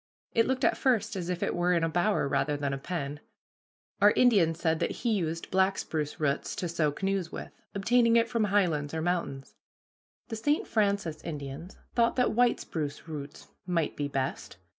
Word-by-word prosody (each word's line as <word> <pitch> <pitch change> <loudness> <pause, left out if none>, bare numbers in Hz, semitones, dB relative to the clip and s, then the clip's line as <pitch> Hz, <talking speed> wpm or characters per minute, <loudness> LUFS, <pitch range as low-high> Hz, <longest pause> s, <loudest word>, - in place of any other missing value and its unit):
It 230 - +3
looked 260 0 +1
at - - +2
first 245 -5 +1
as 180 -2 -4
if 180 -1 -2
it - - 0
were 175 +1 +2
in 170 -2 +2
a - - +3
bower 175 -1 +1
rather 140 +1 0
than 140 -1 -2
a 135 - -3
pen. 145 -2 -4 0.8
Our 205 - +8
Indian 205 -9 +4
said 160 -1 0
that - - 0 0.2
he 235 - +3
used 165 -4 -2
black 190 +1 +3
spruce 150 -2 -3
roots 145 -2 -1
to 180 - -2
sew 160 -3 +1
canoes 195 +1 -2
with, - - -7 0.2
obtaining 230 +3 +3
it 230 0 +4
from 230 -2 +1
high 205 -1 +3
lands 150 -2 -2
or 160 - -1
mountains. 170 -6 -2 0.8
The 225 - -3
St. 290 +7 +1
Francis 200 -7 0
Indians 150 +3 -6 0.2
thought 235 -1 +3
that 250 - +2
white 240 +1 +3
spruce 150 -1 -5
roots 150 -2 -8 0.2
might 170 -4 0
be 145 - -2
best. 135 -8 -3
175 Hz, 190 wpm, -29 LUFS, 150-205 Hz, 0.8 s, Our